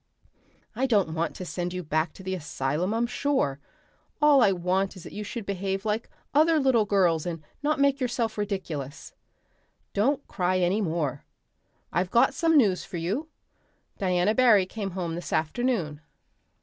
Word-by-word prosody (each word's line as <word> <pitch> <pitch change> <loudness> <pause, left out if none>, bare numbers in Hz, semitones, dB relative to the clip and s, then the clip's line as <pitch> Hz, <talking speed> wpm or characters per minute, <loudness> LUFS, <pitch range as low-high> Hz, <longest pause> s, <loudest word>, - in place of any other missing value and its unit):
"I 265 +4 +1
don't 200 -9 +2
want 165 +1 -2
to 185 - -6
send 175 0 -3
you 180 0 -4
back 155 +1 0
to 190 - -12
the 190 0 -3
asylum, 150 +1 -2
I'm 230 +2 +1
sure. 235 - 0 0.6
All 295 -2 +6
I 200 - +5
want 185 +2 0
is 185 - -11
that - - -10
you 210 - -4
should 225 +1 -6
behave 195 +1 -2
like 215 +2 -1 0.2
other 315 +2 +4
little 260 -6 +3
girls 180 -6 +2
and 165 -3 -5 0.2
not 300 0 0
make 280 0 +3
yourself 240 -3 -1
ridiculous. 170 -9 -4 0.8
Don't 270 +8 +1
cry 185 0 0
any 185 +4 +1
more. 160 -6 -2 0.7
I've 180 +1 +1
got 235 +6 +4
some 325 +1 +3
news 200 -9 +3
for 175 - -7
you. 195 - -2 0.7
Diana 185 +1 +2
Barry 225 -6 +5
came 200 +1 -5
home 170 -3 -2
this 175 +1 -6
afternoon. 160 - -1
195 Hz, 160 wpm, -27 LUFS, 175-235 Hz, 0.8 s, All